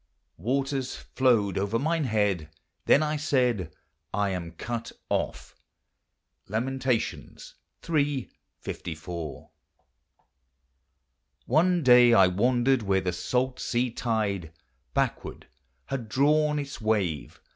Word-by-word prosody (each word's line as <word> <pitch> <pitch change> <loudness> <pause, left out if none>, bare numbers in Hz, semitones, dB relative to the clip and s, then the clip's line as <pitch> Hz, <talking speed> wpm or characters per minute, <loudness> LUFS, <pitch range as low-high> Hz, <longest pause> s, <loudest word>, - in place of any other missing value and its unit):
"Waters 135 +1 -1
flowed 115 -8 +1
over 100 +3 0
mine 160 +4 0
head; 100 -9 0 0.4
then 155 - +6
I 155 0 -1
said, 125 - +1 0.4
I 100 0 0
am 85 -3 -5
cut 115 +6 -5 0.2
off."— - - -2 0.9
Lamentations 125 +2 -2 0.3
iii. 145 -5 0 0.3
54. 80 -1 -6 1.9
One 170 +5 +3
day 125 -2 +7
1 95 -4 +5
wandered 125 +4 +3
where 95 -2 +1
the 90 -1 -2
salt 125 +8 -1
sea 120 0 0
tide 105 -8 -2 0.4
Backward - - -2 0.4
had 125 -5 -4
drawn 150 +4 +3
its 140 -3 -5
wave. 100 -9 -1
120 Hz, 100 wpm, -27 LUFS, 100-135 Hz, 1.9 s, day